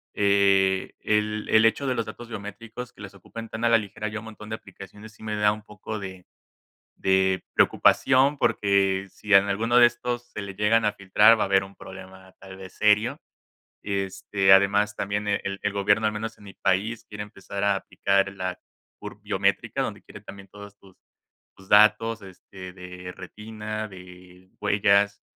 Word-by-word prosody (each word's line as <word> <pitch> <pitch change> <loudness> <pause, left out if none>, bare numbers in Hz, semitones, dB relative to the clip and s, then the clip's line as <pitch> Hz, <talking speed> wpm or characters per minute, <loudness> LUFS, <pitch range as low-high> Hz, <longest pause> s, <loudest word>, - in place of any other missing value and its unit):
Eh, 100 -1 +2
el 105 0 -1
el 110 0 +5
hecho 125 +5 +2
de 130 -1 0
los 115 - -2
datos 120 +2 -10
biométricos 115 +3 -8
que - - -16
les 100 -1 -9
ocupan 115 +4 -10
tan 110 +1 -3
a 115 - +4
la 115 - +6
ligera, 110 0 -5
hay 105 +1 -5
un 110 - -7
montón 110 -1 -11
de 110 - -3
aplicaciones, 105 +1 -13
sí 105 - -21
me 110 -1 -4
da 105 0 +3
un 105 0 -7
poco 105 +1 -7
de 95 -2 -9 0.7
de 95 -1 +1
preocupación, 135 +2 +3
porque 100 -3 +1
si 105 +2 -4
en 100 0 +7
alguno 115 +4 +1
de 120 -1 +8
estos 120 0 -5
se 105 - -6
le 100 - -7
llegan 105 +3 +2
a 105 - +1
filtrar, 105 +3 +4
va - - +2
a - - 0
haber 95 0 +3
un 95 +1 -13
problema 95 0 -12
tal 95 -1 -11
vez 95 -1 -11
serio. 105 +2 +2 0.6
Este, 95 0 0
además, 100 +2 +4
también 105 +1 -3
el 100 -1 -2
el 105 - -1
gobierno, 105 +2 +2
al 105 - 0
menos 110 +2 -5
en 105 - -17
mi 100 - -12
país, 105 +5 -1
quiere 105 0 -6
empezar 100 -1 -8
a 100 -1 +2
aplicar 100 0 0
la 95 -1 -5 0.4
bur - - -9
biométrica - - -1
donde - - -5
quiere - - -13
también 100 0 -12
todas 100 0 -13
tus 95 -2 -20 0.6
tus 95 0 -18
datos, 110 +2 +4
este, 95 -1 -11
de 90 0 -9
retina, 110 0 -7
de 90 -1 -15
huellas. 100 0 +2
100 Hz, 180 wpm, -25 LUFS, 95-110 Hz, 0.7 s, de